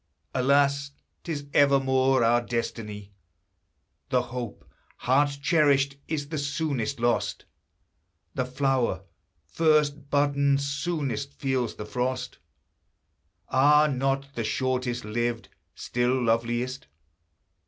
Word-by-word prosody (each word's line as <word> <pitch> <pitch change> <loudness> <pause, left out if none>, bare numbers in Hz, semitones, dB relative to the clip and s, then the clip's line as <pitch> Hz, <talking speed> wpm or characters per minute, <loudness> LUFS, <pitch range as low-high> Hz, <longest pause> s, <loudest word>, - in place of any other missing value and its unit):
Alas! 140 +1 +2 0.3
'tis 150 -4 -4
evermore 135 -2 +4
our 120 +1 +4
destiny, 105 -4 -4 1.0
The 125 -1 +2
hope, 120 - -6 0.3
heart 140 +2 +2
cherished, 140 -4 +3
is 145 -3 -3
the 155 -2 -3
soonest 140 -5 -2
lost; 120 0 0 0.9
The 130 - -1
flower 130 -7 0 0.4
first 150 - +1
budden, 140 -1 +2
soonest 140 -2 -2
feels 130 -4 -1
the 105 - -7
frost: 125 +2 -3 1.1
Are 150 +3 +5
not 135 0 -1
the 115 - -3
shortest 125 0 -1
lived 120 +2 -2 0.3
still 125 +2 0
loveliest? 120 +3 -1
135 Hz, 95 wpm, -26 LUFS, 120-140 Hz, 1.1 s, Are